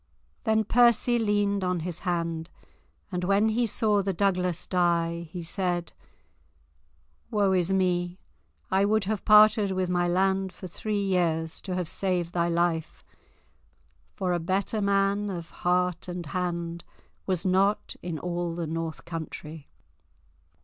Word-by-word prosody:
Then 220 0 +3
Percy 240 +1 +4
leaned 205 -2 +1
on 180 -2 0
his 170 0 -4
hand, 170 -2 -2 0.6
and 180 -1 -2
when 200 +4 +3
he 235 +2 +1
saw 210 -1 +2
the 195 0 -1
Douglas 180 -2 0
die, 170 -2 0
he 175 -1 -6
said, 175 -1 -2 1.4
"Woe 205 -3 +2
is 185 -1 +1
me. 180 -2 +1 0.5
I 190 +1 +3
would 215 +1 +2
have 210 0 -2
parted 215 -1 +6
with 185 -1 -1
my 175 0 +1
land 190 +1 +1
for 185 - -10
three 210 +5 -3
years 165 -4 0
to 185 -2 -4
have 180 -2 -2
saved 180 -2 -1
thy 170 -1 +1
life, 170 -1 -1 1.1
for 185 -2 -1
a 175 - 0
better 195 +5 -1
man 200 +1 +1
of 170 -3 -6
heart 180 0 0
and 175 -1 -5
hand 170 +1 -3 0.4
was 185 -2 0
not 190 +3 +1
in 175 -2 -4
all 175 0 -3
the 170 -1 -3
north 165 0 -4
country." 160 -2 -7
180 Hz, 140 wpm, -27 LUFS, 170-200 Hz, 1.4 s, parted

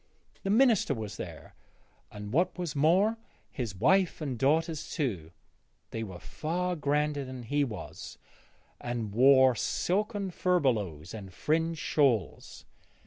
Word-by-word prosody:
The 195 - -3
minister 220 - +4
was 110 -3 -6
there, - - -8 0.6
and 105 +1 -8
what 175 +6 +1
was 170 -4 -4
more, 185 +10 +3 0.3
his 115 -8 -4
wife 180 - +3
and 140 -5 -3
daughters 155 +5 +1
too; 105 - -2 0.6
they 115 - -4
were 95 -5 -6
far 175 - -3
grander 150 -1 0
than 130 -1 -8
he 145 +5 +1
was, 115 -6 -7 0.6
and 120 -4 -4
wore 130 +2 +6
silken 200 - -1
furbelows 110 - 0
and 100 -4 -8
fringed 165 - 0
shawls. 120 - 0
140 Hz, 125 wpm, -29 LUFS, 115-175 Hz, 0.6 s, wore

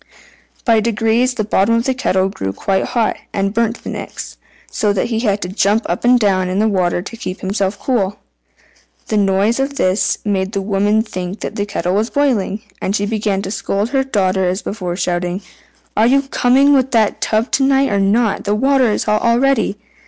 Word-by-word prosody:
By 230 -3 +4
degrees 230 +3 +1
the 220 - -1
bottom 210 +2 +2
of 230 - +1
the 265 - 0
kettle 190 -7 +1
grew 95 - -4
quite 190 - -1
hot, 235 -3 0 0.2
and 195 0 -1
burnt 230 +1 -1
the - - -6
Nix, - - -7 0.3
so 210 - +1
that 200 - -1
he 225 -2 -1
had 210 -3 0
to - - -3
jump 205 +3 +1
up 175 - -3
and 245 0 +5
down 190 -4 +1
in 185 - -2
the 215 +2 +3
water 180 -4 0
to 230 - -8
keep 200 -5 -6
himself 195 +1 -1
cool. 205 -6 -1 0.9
The 215 - +1
noise 200 +4 +2
of 275 +1 -1
this 185 -4 +1
made 195 -1 -1
the 195 - -1
woman 205 +2 +1
think 185 -2 -6
that - - -5
the 205 0 -2
kettle 180 -3 -2
was 215 +4 0
boiling, 225 -7 0 0.2
and 195 - -1
she 205 - 0
began 205 -2 -1
to 195 - -5
scold 200 +1 -2
her 270 0 +1
daughter 190 -7 0
as 180 +2 -1
before, 180 -4 -4
shouting, 180 +1 -2 0.5
"Are 220 +2 +4
you 275 +2 +3
coming 270 +1 +3
with 265 -1 +3
that 220 -3 +2
tub 220 +2 0
to 270 - +2
night 270 0 +3
or 200 - +1
not? 210 +3 +1
The 205 +1 +1
water 265 +1 +3
is - - -1
hot 210 0 +1
already." 235 -2 +2
210 Hz, 205 wpm, -17 LUFS, 195-235 Hz, 0.9 s, and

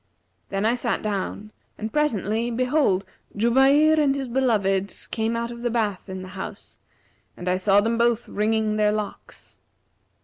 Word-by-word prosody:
Then 195 +1 -1
I 225 - +3
sat 240 -1 -1
down 210 0 -3 0.3
and 215 0 -5
presently, 230 -6 0
behold, 250 -5 +1 0.3
Jubayr 270 +7 +4
and 280 -2 +3
his 270 -2 -3
beloved 205 -7 +1 0.2
came 225 +1 -1
out 235 0 -2
of 235 0 -9
the 240 - 0
bath 215 -5 -2
in 190 0 -6
the 185 - -9
house, 190 0 -9 0.6
and 180 - -7
I 180 0 +2
saw 195 +2 +4
them 230 +2 0
both 235 0 +2
wringing 215 0 0
their 210 0 +3
locks. 210 -1 -7
220 Hz, 160 wpm, -24 LUFS, 200-240 Hz, 0.6 s, Jubayr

